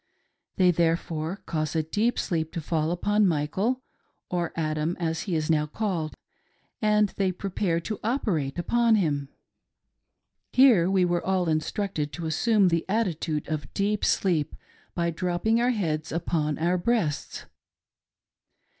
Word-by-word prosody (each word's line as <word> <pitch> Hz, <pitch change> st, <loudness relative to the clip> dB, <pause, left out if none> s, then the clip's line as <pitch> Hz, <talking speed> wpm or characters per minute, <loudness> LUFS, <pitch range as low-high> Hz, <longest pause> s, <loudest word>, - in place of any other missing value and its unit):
They, 180 Hz, -2 st, +5 dB
therefore, 165 Hz, +2 st, -1 dB
cause 155 Hz, -1 st, -2 dB
a 160 Hz, -, +2 dB
deep 215 Hz, +9 st, 0 dB
sleep 160 Hz, -2 st, -1 dB
to 170 Hz, -, -2 dB
fall 155 Hz, 0 st, 0 dB
upon 205 Hz, +4 st, +2 dB
Michael 185 Hz, -, 0 dB, 0.2 s
— -, -, -40 dB
or 175 Hz, -2 st, -1 dB
Adam 155 Hz, +1 st, -1 dB
as 165 Hz, -1 st, -1 dB
he 175 Hz, -, 0 dB
is 155 Hz, -1 st, 0 dB
now 150 Hz, -2 st, +2 dB
called 170 Hz, -3 st, -2 dB, 0.4 s
— -, -, -41 dB, 0.2 s
and 210 Hz, -2 st, +2 dB
tbey 185 Hz, -2 st, 0 dB
pre 195 Hz, -, -4 dB
pare 175 Hz, -3 st, 0 dB
to 215 Hz, +4 st, -4 dB
Operate 200 Hz, -, -1 dB
upon 230 Hz, +6 st, +3 dB
him. 145 Hz, -8 st, 0 dB, 1.2 s
Here 235 Hz, -10 st, +6 dB
we 190 Hz, -2 st, +3 dB
were 175 Hz, -1 st, 0 dB
all 185 Hz, -2 st, +1 dB
instructed 155 Hz, 0 st, -1 dB
to 170 Hz, -, -5 dB
assume 195 Hz, +5 st, +3 dB
the 165 Hz, -1 st, +1 dB
attitude 170 Hz, -8 st, -1 dB
of 155 Hz, -1 st, -4 dB
deep 205 Hz, +1 st, 0 dB
sleep 160 Hz, -6 st, +1 dB, 0.4 s
by 170 Hz, -1 st, 0 dB
dropping 180 Hz, +7 st, 0 dB
our 245 Hz, -, +3 dB
heads 160 Hz, -10 st, -1 dB
upon 160 Hz, -3 st, -1 dB
our 175 Hz, +3 st, +1 dB
breasts. 175 Hz, -8 st, -1 dB
175 Hz, 145 wpm, -26 LUFS, 155-205 Hz, 1.2 s, Here